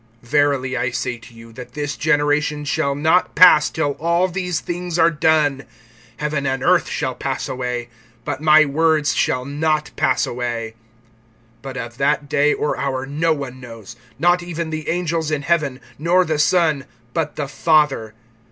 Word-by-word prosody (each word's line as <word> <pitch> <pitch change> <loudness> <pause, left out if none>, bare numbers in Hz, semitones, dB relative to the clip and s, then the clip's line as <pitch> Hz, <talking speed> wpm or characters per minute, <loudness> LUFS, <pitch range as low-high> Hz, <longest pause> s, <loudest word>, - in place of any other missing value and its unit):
(30)Verily 140 -1 +1
I 125 0 0
say 120 0 -3
to 115 - -15
you, 115 0 -14
that 125 +1 -10
this 145 0 -3
generation 150 -1 +1
shall 140 -1 0
not 160 +5 +2
pass, 155 -5 +7
till 155 -3 -1
all 170 +3 +2
these 180 -2 -2
things 175 -1 -4
are 165 0 +4
done. 150 -3 +1 0.6
(31)Heaven 150 -2 -2
and 135 -1 -3
earth - - +3
shall - - -2
pass - - -4
away; 125 -2 -4 0.4
but 145 - -4
my 155 0 +6
words 155 +1 +1
shall 125 0 0
not 150 +2 -1
pass 130 - +1
away. 120 -2 -4 0.9
(32)But 135 -1 -7
of 120 -1 -7
that 145 +1 +1
day 145 +1 +2
or 150 - -1
hour 135 -1 -2
no 155 +4 0
one 135 -4 -4
knows, 115 -3 -11 0.2
not 175 +4 +3
even 170 -2 -5
the 155 -1 -4
angels 165 -2 -1
in 150 -2 -2
heaven, 145 -6 0 0.2
nor 175 +4 +3
the 155 -2 -1
Son, 155 -3 +2 0.3
but 155 -2 -2
the 145 - -3
Father. 135 -6 +1
150 Hz, 165 wpm, -20 LUFS, 130-160 Hz, 0.9 s, pass